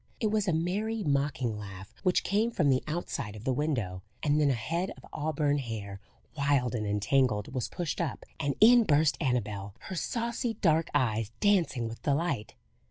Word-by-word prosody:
It 215 -2 +1
was 210 -2 +1
a - - +3
merry, 205 +7 -1
mocking 140 - 0
laugh, 95 -2 -9
which 185 -2 +2
came 210 +4 +2
from 165 -11 +1
the 130 -1 +3
outside 150 -9 -3
of 105 - -9
the 130 - +1
window, 120 -11 -1 0.2
and 150 0 +3
then 145 - +4
a 135 - +2
head 165 - -2
of - - -14
auburn 145 -1 0
hair, 105 -6 -5 0.4
wild 140 -4 +1
and 110 -3 -2
entangled, 105 +2 +1
was 125 -4 -2
pushed 170 -3 -3
up, 140 -11 -3
and 140 -1 0
in 235 +2 +8
burst 155 -4 +3
Annabel, 105 -7 -1
her 190 - -7
saucy 235 - -2
dark 165 -5 +2
eyes 115 -6 +1
dancing 165 - +2
with 115 +1 -8
delight. 140 - -1
145 Hz, 175 wpm, -29 LUFS, 115-175 Hz, 0.4 s, in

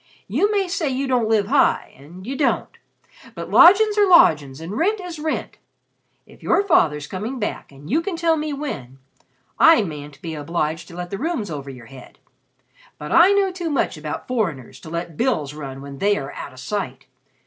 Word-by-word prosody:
You 410 +1 +1
may 400 -2 +1
say 345 -5 -1
you 265 +1 -2
don't 245 -4 +1
live 215 -2 +2
high 270 +6 +2
and 170 +8 -13
you 265 +4 -4
don't 280 - 0 0.6
but - - -7
lodgin's 410 +5 +6
are 410 - +5
lodgin's 150 - +5
and 165 +5 -6
rent 405 - +1
is 355 -4 -7
rent. 310 +1 -4 0.7
If - - -19
your 400 - +2
father's 150 - +2
coming 210 - -5
back 210 -8 -4
and 140 +2 -14
you 305 +8 +1
can 355 +1 -4
tell 330 -1 +2
me 305 -1 -3
when, 215 - -6 0.6
I 325 -9 +7
mayn't 145 -5 -8
be 165 -2 -5
obliged 155 +1 -3
to 170 - -12
let 175 0 -6
the 195 - -4
rooms 295 - -2
over 140 -2 -6
your 125 -3 -11
heads; 130 +1 -14 0.8
but - - -7
I 345 +3 +6
know 395 -1 +2
too 355 -2 -4
much 290 - 0
about 150 -1 -6
foreigners 180 - -3
to 160 - -11
let 170 -1 -5
bills 155 - 0
run 135 -3 -8
when 140 -1 -9
they 205 0 +2
are 135 0 -6
out - - -8
of 130 - -13
sight. 200 +10 -4
210 Hz, 195 wpm, -21 LUFS, -, 0.8 s, I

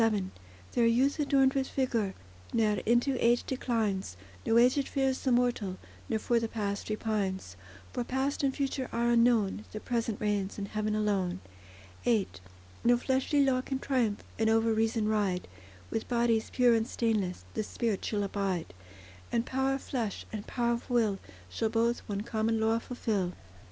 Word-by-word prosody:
VII 205 -4 +1 0.4
There 235 -1 +3
youth 260 +6 +3
adorned 275 -2 +4
with 270 -1 0
vigour 230 -7 0 0.4
Ne'er 215 -3 +2
into 240 +3 +2
age 240 +1 +4
declines; 215 - -1 0.3
No 225 - +4
aged 255 +4 +4
fears 270 -2 0
the 260 - +1
mortal, 240 -6 +1 0.3
Nor 225 - +1
for 235 +2 +1
the 230 - -1
past 205 -3 -3
repines; 200 - -2 0.4
For 245 - -1
past 265 +3 -1
and 275 -1 +2
future 270 -1 -2
are 235 +1 +1
unknown: 230 -4 +3
The 215 - -5
present 230 -2 -2
reigns 205 -2 -1
in 200 - -3
heaven 215 +1 -2
alone. 195 -4 0 0.6
VIII 225 -5 +2 0.6
No 240 +1 +5
fleshly 265 +3 +2
law 255 -1 +2
can 265 +1 -3
triumph, 245 -6 0 0.2
And 220 0 +3
over 225 0 +3
reason 220 0 +1
ride; 205 -4 0 0.4
With 225 - -2
bodies 235 -2 +2
pure 245 -2 +4
and 225 0 +1
stainless 215 -8 -1
The 220 - -1
spirit 215 -1 -2
shall 205 -2 -1
abide; 190 - -2 0.6
And 235 0 +1
power 265 +1 0
of 270 - -6
flesh, 230 -7 -3
and 210 -2 -5
power 235 -1 +1
of 235 - -5
will, 220 -5 +2 0.3
Shall 220 - -1
both 230 +1 +1
one 200 -1 -1
common 220 +1 0
law 225 +1 +2
fulfil. 210 -7 -2
225 Hz, 165 wpm, -30 LUFS, 210-245 Hz, 0.6 s, No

